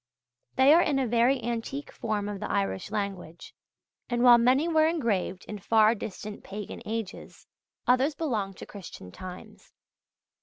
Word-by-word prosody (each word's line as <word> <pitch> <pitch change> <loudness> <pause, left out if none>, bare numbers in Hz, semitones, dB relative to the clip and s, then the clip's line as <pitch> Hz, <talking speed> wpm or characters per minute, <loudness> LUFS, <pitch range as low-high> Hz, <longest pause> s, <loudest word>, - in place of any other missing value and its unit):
They 265 +3 +6
are 340 - +6
in 295 -5 +1
a 265 - +1
very 240 +3 +3
antique 240 +5 -4
form 215 -3 -3
of 205 -1 -5
the 210 - -5
Irish 95 - -1
language; 195 -5 -5 0.6
and 240 0 0
while 240 -1 +8
many 260 +7 +3
were 315 -2 +4
engraved 220 - -1
in 210 - -7
far 215 +2 +4
distant 210 -1 -7
pagan 205 +1 -7
ages, 220 -3 -6 0.4
others 260 +4 +3
belong 220 - -2
to - - -9
Christian 175 - -10
times. 185 - -11
225 Hz, 150 wpm, -28 LUFS, 200-260 Hz, 0.6 s, while